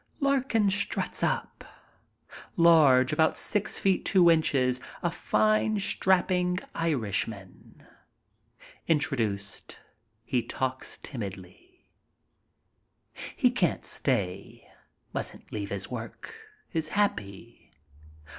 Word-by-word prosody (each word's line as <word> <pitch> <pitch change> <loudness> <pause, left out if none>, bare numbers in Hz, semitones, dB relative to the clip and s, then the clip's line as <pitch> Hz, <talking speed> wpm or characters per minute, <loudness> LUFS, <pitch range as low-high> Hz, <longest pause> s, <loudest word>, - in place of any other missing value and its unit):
Larkin 265 -7 +2
struts 205 - -1
up. - - -2 0.9
Large, 150 -7 +5
about 160 -1 +2
six 210 0 0
feet 190 -1 +1
two 180 -4 +5
inches, 130 -6 +2 0.2
a 175 - +1
fine, 215 +4 +1
strapping 180 -2 +1 0.2
Irishman. 110 - -3 1.0
Introduced, 110 -10 -1 0.5
he 125 +1 0
talks 130 +2 -3
timidly. 115 - -9 1.5
He 250 - +3
can't 200 -9 0
stay, 100 -8 -3 0.5
mustn't - - -5
leave 100 -2 -4
his 100 +2 -4
work. 120 - -7 0.4
Is 160 -2 -1
happy. 110 - -3
155 Hz, 85 wpm, -28 LUFS, -, 1.5 s, Large